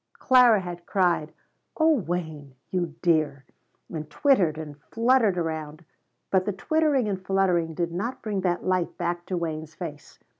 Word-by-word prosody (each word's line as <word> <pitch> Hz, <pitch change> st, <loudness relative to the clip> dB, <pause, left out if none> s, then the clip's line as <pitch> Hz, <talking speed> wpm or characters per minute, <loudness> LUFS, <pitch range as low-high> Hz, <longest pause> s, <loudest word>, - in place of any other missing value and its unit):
Clara 250 Hz, -5 st, +5 dB
had 175 Hz, -1 st, -8 dB
cried: 175 Hz, -5 st, +1 dB, 0.5 s
"Oh 320 Hz, 0 st, +5 dB
Wayne 160 Hz, -, -4 dB, 0.2 s
you 175 Hz, -4 st, -2 dB
dear!" 155 Hz, -5 st, +1 dB, 0.5 s
and 155 Hz, -2 st, -5 dB
twittered 185 Hz, -, +2 dB
and 150 Hz, -2 st, -8 dB
fluttered 230 Hz, -, +2 dB
around, 160 Hz, -1 st, -4 dB, 0.5 s
but 185 Hz, -1 st, +3 dB
the 205 Hz, -, -1 dB
twittering 290 Hz, +2 st, +1 dB
and 190 Hz, -2 st, -3 dB
fluttering 180 Hz, -4 st, +1 dB
did 170 Hz, 0 st, -1 dB
not 215 Hz, +9 st, -4 dB
bring 210 Hz, -4 st, -2 dB
that 180 Hz, -1 st, -1 dB
light 185 Hz, -2 st, 0 dB
back 175 Hz, 0 st, -3 dB
to 185 Hz, -, -2 dB
Wayne's 160 Hz, -2 st, -4 dB
face. 155 Hz, -5 st, -8 dB
175 Hz, 150 wpm, -26 LUFS, 160-200 Hz, 0.5 s, Clara